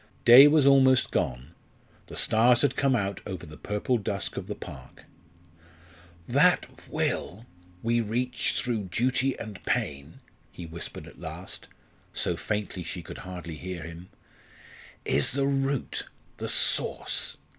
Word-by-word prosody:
Day 125 +4 +11
was 150 -1 +4
almost 130 -2 +5
gone; 65 +5 -2 0.6
the - - -9
stars 120 +4 +4
had 145 - +2
come 135 -2 +2
out 100 -3 -2
over 95 -3 -6
the 75 -1 -11
purple 105 +7 -1
dusk 100 -3 -3
of - - -5
the - - -4
park. 65 -2 -11 1.2
"That - - +4 0.2
Will 105 +8 -2 0.4
we 115 +1 +2
reach 120 +3 -1
through 115 -5 -1
duty 130 +7 0
and 105 -3 -8
pain," 70 +2 -2 0.3
he 85 - -9
whispered 85 +1 -7
at - - -14
last, - - -7 0.5
so - - 0
faintly 105 -3 -3
she 85 +1 -6
could - - -9
hardly 90 -3 -7
hear 90 -1 -6
him, 85 +2 -10 1.0
"is 70 - +2
the 140 0 +1
root, 135 -1 -1 0.3
the - - -4
source. - - 0
105 Hz, 135 wpm, -27 LUFS, 85-130 Hz, 1.2 s, Day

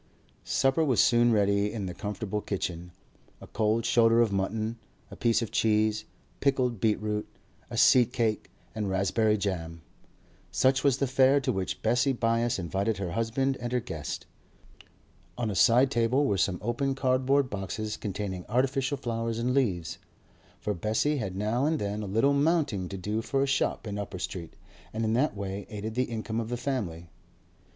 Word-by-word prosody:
Supper 135 +4 +2
was 130 -9 +2
soon 120 +2 +5
ready 100 -1 +2
in 105 -4 -4
the 90 - -4
comfortable 105 +1 -4
kitchen. 90 -3 -4 0.5
A - - -11
cold 110 +1 0
shoulder 115 -1 +4
of 115 -3 +3
mutton, 110 +4 -2 0.3
a - - -8
piece 115 0 +2
of 115 - -6
cheese, 110 0 +1 0.3
pickled 130 -5 +1
beetroot, 105 0 0 0.4
a - - -5
seed 125 -2 +5
cake, 115 -4 -1 0.2
and 105 -2 -2
raspberry 100 +3 +2
jam; 85 -5 -4 0.7
such 130 0 +2
was 140 -3 +3
the 140 - +1
fare 135 +1 +4
to 130 - 0
which 95 -4 -3
Bessie 125 +2 +2
Byass 115 0 +1
invited 95 +4 -1
her 95 -3 -3
husband 115 +6 0
and 120 0 -3
her 125 - +2
guest. 80 -11 -6 1.1
On 115 -3 -1
a - - -4
side 125 +6 +5
table 120 +4 +2
were 105 - +1
some 95 -1 +1
open 135 +4 -1
cardboard 130 +1 +2
boxes 105 +2 -4
containing 95 -2 -4
artificial 135 +3 +1
flowers 115 -3 -3
and 120 +2 0
leaves; 95 - 0 0.6
for 105 - -2
Bessie 110 - 0
had 95 -7 -4
now 110 +7 0
and 160 0 +1
then 105 -3 -3
a 105 - -5
little 115 +8 +2
'mounting' 140 - +1
to 95 - -5
do 105 +4 -2
for 135 +4 0
a - - +2
shop 135 -3 0
in 105 -1 -4
Upper 100 -2 -5
Street, 90 -2 -6 0.4
and 110 +1 -1
in 110 - +1
that 125 -3 +1
way 100 0 -5
aided 105 +1 -5
the 125 +2 +1
income 110 -1 -4
of 115 -1 -4
the 120 - -2
family. 95 -11 -4
110 Hz, 175 wpm, -28 LUFS, 100-125 Hz, 1.1 s, soon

